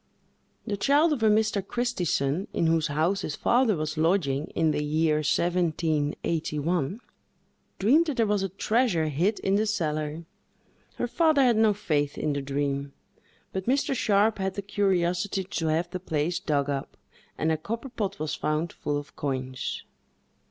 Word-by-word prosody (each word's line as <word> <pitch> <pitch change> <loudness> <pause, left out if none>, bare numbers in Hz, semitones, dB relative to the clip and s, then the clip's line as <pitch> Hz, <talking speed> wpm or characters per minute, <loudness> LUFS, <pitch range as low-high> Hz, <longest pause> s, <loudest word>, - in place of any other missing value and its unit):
The 205 -3 -2
child 290 +8 +3
of 265 - -3
a 220 - +5
Mr. 215 -1 +2
Christison, 185 - -1
in - - +1
whose 160 -1 +2
house 160 +7 0
his 150 - -4
father 240 -4 +3
was 155 0 -3
lodging, 155 -4 +1
in 160 -1 +2
the 150 - -1
year 155 +1 +2
1781, 160 - 0 0.8
dreamed 275 - +4
that 290 -4 -2
there 230 - +3
was 205 -1 +1
a 195 - -1
treasure 195 -4 +1
hid 180 +9 +1
in 195 +1 +2
the 215 +1 +1
cellar. 155 -4 -2 0.7
Her - - -1
father 310 +1 +3
had 245 -3 +4
no 220 -2 +4
faith 145 -7 -1
in 150 - -1
the 140 - -2
dream; 140 0 -2 0.6
but 190 +1 -4
Mr. 275 +2 +2
Sharpe 215 -3 +2
had 190 0 -2
the 200 - -4
curiosity 195 -1 0
to 170 -3 -3
have 165 +3 0
the 185 - -4
place 165 -1 -1
dug 140 -3 0
up, 140 -1 -4 0.4
and 160 +1 +1
a - - +2
copper 230 - -5
pot 205 -5 -3
was 155 -3 -3
found, 155 +3 -1
full 145 0 -2
of 145 0 -8
coins. 130 -2 -3
175 Hz, 165 wpm, -27 LUFS, 150-210 Hz, 0.8 s, a